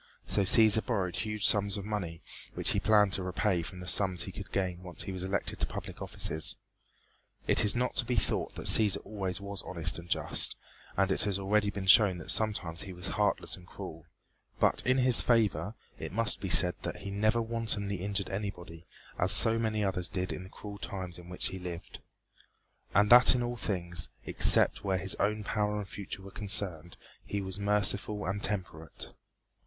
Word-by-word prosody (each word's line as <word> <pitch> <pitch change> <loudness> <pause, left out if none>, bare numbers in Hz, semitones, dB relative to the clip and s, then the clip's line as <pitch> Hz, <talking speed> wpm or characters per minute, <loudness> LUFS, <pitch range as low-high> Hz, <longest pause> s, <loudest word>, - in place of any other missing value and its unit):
So - - 0
Cæsar 110 +2 +5
borrowed 95 -8 -2
huge 105 -1 -2
sums 100 0 +4
of 100 - -7
money 95 -6 -5 0.3
which - - +5
he - - 0
planned 105 -3 +3
to 95 - 0
repay 90 0 -1
from 90 +2 -9
the 90 - -9
sums 95 -2 +1
he 95 - -7
could 95 0 -10
gain 95 -2 -2
when 90 - -15
once 90 - -5
he - - -6
was 95 -1 -4
elected 95 +1 -2
to - - 0
public - - -8
offices. 80 0 0 0.9
It - - +4
is 105 - +3
not 125 +1 -1
to 120 - +2
be 125 +1 -2
thought 110 - -2
that - - -8
Cæsar 105 -3 +5
always 95 -2 -4
was 100 0 -6
honest 85 -2 -1
and 85 0 -13
just, - - -2 0.4
and 95 0 +1
it - - 0
has 100 -2 -1
already 100 +1 0
been 100 -1 -6
shown 95 -1 +5
that 80 - -6
sometimes 95 -7 -1
he 95 - -7
was 90 +1 -6
heartless 105 -1 -1
and 90 -1 -17
cruel 80 -6 -10 0.5
but - - +1
in 130 +1 +3
his 125 -2 +5
favor 115 -2 0 0.2
it - - -6
must 115 +2 0
be 95 - -4
said 90 +2 +6
that - - -6
he 100 - -6
never 110 +3 +1
wantonly 110 -3 -2
injured 100 0 -3
anybody, 90 -4 -7 0.3
as - - +2
so 115 0 +5
many 110 -2 -1
others 90 -2 -1
did 90 0 -3
in - - -7
the 95 - -11
cruel 100 0 -10
times 90 -4 -5
in 90 0 -14
which 90 - +3
he 95 - -7
lived 90 -2 -8 1.0
and 105 +3 +3
that 125 +1 +9
in 120 - -1
all 120 0 -3
things, 90 -8 -2 0.2
except - - +3
where 95 -2 0
his 95 +1 -1
own 105 +1 -1
power 105 0 -2
and 105 -2 -5
future 95 -1 -8
were 100 - -11
concerned, 95 -5 0 0.3
he 100 - -4
was 95 0 -5
merciful 105 0 0
and 95 +2 -3
temperate. 90 -6 -3
100 Hz, 200 wpm, -30 LUFS, 90-105 Hz, 1.0 s, that